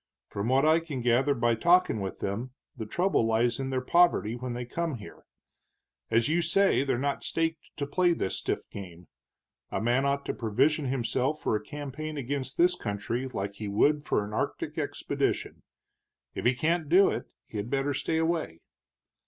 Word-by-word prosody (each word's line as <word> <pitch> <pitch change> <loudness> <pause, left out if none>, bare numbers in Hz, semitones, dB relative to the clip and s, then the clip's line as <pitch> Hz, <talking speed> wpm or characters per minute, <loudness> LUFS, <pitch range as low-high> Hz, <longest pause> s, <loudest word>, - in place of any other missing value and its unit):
"From 100 +2 -3
what 135 +3 +3
I 160 +1 +5
can 155 -6 -5
gather 125 +4 +3
by 120 0 +2
talking 170 -1 +3
with 95 -1 -5
them, 115 +6 -3 0.2
the 110 -4 -6
trouble 180 - +1
lies 115 +2 +1
in 135 0 -2
their 130 -1 -1
poverty 170 -11 +3
when 125 0 -5
they 120 0 -4
come 165 +4 -2
here. 105 -4 -12 0.8
As 115 0 +3
you 165 +3 +2
say, 195 -4 +3
they're 135 -3 0
not 140 +2 -1
staked 165 0 -2
to 145 - -1
play 175 +4 +2
this 95 - -2
stiff - - -3
game. 90 -3 -9 0.6
A - - -2
man 120 +4 +2
ought 140 0 0
to - - -2
provision 135 +7 +1
himself 130 +3 0
for - - 0
a 105 - -2
campaign 150 +3 -6
against 135 0 -3
this 180 +1 +5
country 115 - -3
like 100 -5 -4
he 105 - -5
would 145 +9 +2
for 105 - 0
an 105 - -8
Arctic - - -2
expedition. - - -2 0.7
If - - -5
he 125 +1 +4
can't 160 +3 0
do 190 +4 +6
it, - - -3 0.2
he'd 105 +1 -5
better 140 +1 0
stay 160 +3 -1
away." 160 - -1
130 Hz, 180 wpm, -28 LUFS, 115-155 Hz, 0.8 s, do